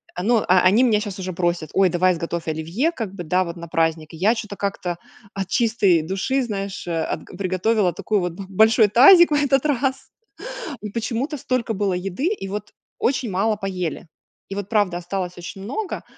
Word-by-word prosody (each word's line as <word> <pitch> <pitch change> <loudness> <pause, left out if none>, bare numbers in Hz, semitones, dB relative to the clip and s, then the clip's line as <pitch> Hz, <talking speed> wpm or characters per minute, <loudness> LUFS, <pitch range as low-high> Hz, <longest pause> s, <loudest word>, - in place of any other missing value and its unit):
Оно, 215 +5 +2
э, - - -5
они 185 +6 +5
меня 225 -5 +3
сейчас 205 -2 -5
уже 185 0 -4
просят, 175 -3 -1
ой, 190 -1 +4
давай 180 +1 +2
сготовь 170 0 -4
оливье, 165 - -1
как 225 - -5
бы 190 -3 -6
да 180 +3 +1
вот 170 -2 -6
на 170 -1 -8
праздник. 160 -1 -1
И, - - -9
я 210 +8 +3
чё-то 210 -3 -6
как-то 185 -3 -3 0.4
от 195 -2 -3
чистой 210 -6 +2
души, 190 +11 -1
знаешь, 200 -4 -4
э, 165 -2 -1
от, - - -4
приготовила 185 +1 0
такой, 210 +5 -1
вот, 180 -2 -2
б 195 +3 -8
большой 220 +3 +4
тазик 335 - +8
в - - +2
этот 285 -1 +2
раз. 270 -2 -1 0.7
И 210 - -5
почему-то 235 +7 -2
столько 250 -3 -1
было 200 -2 0
еды 190 - -2
и 390 - -2
вот 210 +1 -5 0.3
очень 255 -2 0
мало 210 +4 +1
поели. 180 -5 -4 0.4
И 195 - -5
вот 200 -1 -4
правда 205 -6 +1
осталось 180 0 -4
очень 180 +2 -8
много. 355 - -4
195 Hz, 195 wpm, -22 LUFS, 180-230 Hz, 0.7 s, тазик